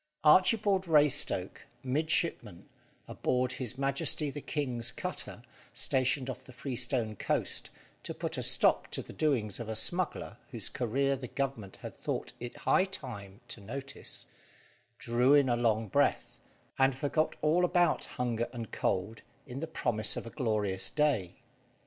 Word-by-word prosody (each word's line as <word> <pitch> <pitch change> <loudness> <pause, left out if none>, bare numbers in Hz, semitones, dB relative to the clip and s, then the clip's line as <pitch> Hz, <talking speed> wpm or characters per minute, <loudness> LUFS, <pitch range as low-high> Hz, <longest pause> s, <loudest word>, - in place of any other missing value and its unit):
Archibald 190 +4 +4
Raystoke 150 -3 +2 0.2
midshipman 135 - 0 0.4
aboard 125 0 0
His 125 -1 -3
Majesty 140 +2 +1
the 145 - -6
king's 125 -7 -1
cutter, - - -4 0.3
stationed 130 0 +1
off 130 -1 -6
the 130 - -13
Freestone 125 -3 -1
coast, - - -1 0.3
to - - -5
put - - -3
a - - -3
stop - - +3
to - - -1
the - - -11
doings 125 -10 0
of 115 -2 -5
a 110 - -2
smuggler 175 +10 +1
whose - - -2
career 135 +3 0
the 130 -1 -7
Government 120 -8 -3
had - - -7
thought - - -4
it 120 0 -7
high 190 - +4
time 105 - -8
to 110 - -7
notice 135 +7 -7 0.7
drew 125 +4 +3
in 140 -2 +5
a 120 - +3
long 115 -2 +1
breath, - - +1 0.4
and 135 0 +4
forgot 150 +3 0
all 160 +4 +3
about 175 -1 +2
hunger 120 -2 -2
and 115 -3 -7
cold 105 +5 -1 0.2
in 135 -1 -7
the 165 - -4
promise 110 -9 0
of - - -5
a 115 - -8
glorious 105 -7 0
day. 140 - +1
130 Hz, 150 wpm, -31 LUFS, 115-145 Hz, 0.7 s, in